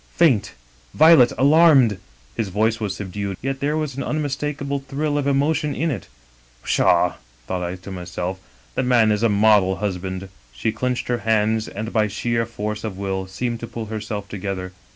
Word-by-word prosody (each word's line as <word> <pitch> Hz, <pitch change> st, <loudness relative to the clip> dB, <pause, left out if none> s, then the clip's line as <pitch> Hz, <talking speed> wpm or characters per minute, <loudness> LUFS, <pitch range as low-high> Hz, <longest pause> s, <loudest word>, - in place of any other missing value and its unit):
faint, 140 Hz, -12 st, +3 dB, 0.4 s
Violet, 155 Hz, -6 st, +7 dB
alarmed!' 140 Hz, -, +5 dB, 0.4 s
His 110 Hz, -, -1 dB
voice 110 Hz, +4 st, +1 dB
was 105 Hz, -3 st, -2 dB
sub 100 Hz, -3 st, -6 dB
dued, 100 Hz, -2 st, -3 dB
yet 135 Hz, +1 st, -3 dB
there 150 Hz, +2 st, 0 dB
was 150 Hz, -4 st, -3 dB
an 135 Hz, -, -4 dB
unmistakable 145 Hz, -1 st, -2 dB
thrill 145 Hz, +2 st, -2 dB
of 145 Hz, -1 st, 0 dB
emotion 145 Hz, +2 st, +1 dB
in 165 Hz, +1 st, 0 dB
it. 130 Hz, -, -5 dB, 0.3 s
"' -, -, -32 dB
Pshaw -, -, +3 dB
1' -, -, -14 dB, 0.3 s
thought 90 Hz, +4 st, -3 dB
I 90 Hz, +1 st, -3 dB
to 95 Hz, +2 st, -10 dB
myself, 90 Hz, 0 st, -4 dB, 0.3 s
'the -, -, 0 dB
man 120 Hz, -4 st, +4 dB
is 105 Hz, 0 st, 0 dB
a 115 Hz, -, +3 dB
model 105 Hz, -2 st, +4 dB
husband.' 95 Hz, -1 st, -4 dB
" -, -, -32 dB
She 60 Hz, -, -1 dB
clinched 125 Hz, +3 st, -2 dB
her 120 Hz, -1 st, 0 dB
hands, 110 Hz, 0 st, +1 dB
and 110 Hz, +3 st, -6 dB
by 110 Hz, -2 st, +3 dB
sheer 115 Hz, +2 st, -1 dB
force 105 Hz, -2 st, -4 dB
of 105 Hz, -4 st, -4 dB
will 95 Hz, -1 st, -3 dB
seemed 120 Hz, +5 st, -3 dB
to 115 Hz, -, -6 dB
pull 115 Hz, -1 st, -6 dB
herself 105 Hz, -2 st, -4 dB
together. 95 Hz, -2 st, -5 dB
110 Hz, 190 wpm, -22 LUFS, 95-135 Hz, 0.4 s, Violet